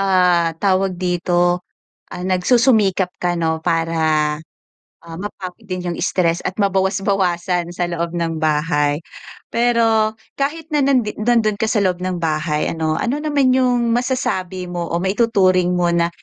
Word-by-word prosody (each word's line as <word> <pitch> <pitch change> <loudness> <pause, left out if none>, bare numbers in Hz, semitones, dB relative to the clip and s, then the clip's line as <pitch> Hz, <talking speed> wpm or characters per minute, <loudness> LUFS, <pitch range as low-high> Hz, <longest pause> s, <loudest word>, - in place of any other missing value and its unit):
Ah, 180 -3 +3
tawag 190 -1 +2
dito, 175 0 +1 0.5
ah, 180 - -7
nagsusumikap 195 -1 +2
ka 175 -1 0
'no, 160 -1 -1
para 160 -2 +1 0.7
ah, 165 -1 -9
mapawi 195 0 -7
din 180 -1 -4
'yung 175 -1 -3
stress 175 -2 +1
at 185 - -4
mabawas-bawasan 190 -3 0
sa 175 0 -2
loob 170 -1 -2
ng 165 -2 -2
bahay. 150 -1 +1 0.6
Pero 225 -2 +2 0.2
kahit 305 +3 -2
na 295 - +3
nandi 250 -6 +2
nandun 225 -2 +2
ka 220 - 0
sa 215 - +2
loob 180 -1 0
ng 185 -1 -2
bahay 155 -1 -1
ano, 160 -1 -1
ano 280 +5 -1
naman 285 -4 +2
'yung 245 -2 +2
masasabi 190 -8 -2
mo 175 -1 -4
o 170 - -1
maituturing 190 -3 +2
mo 175 -1 +2
na 170 0 +2
185 Hz, 145 wpm, -19 LUFS, 170-220 Hz, 0.7 s, Ah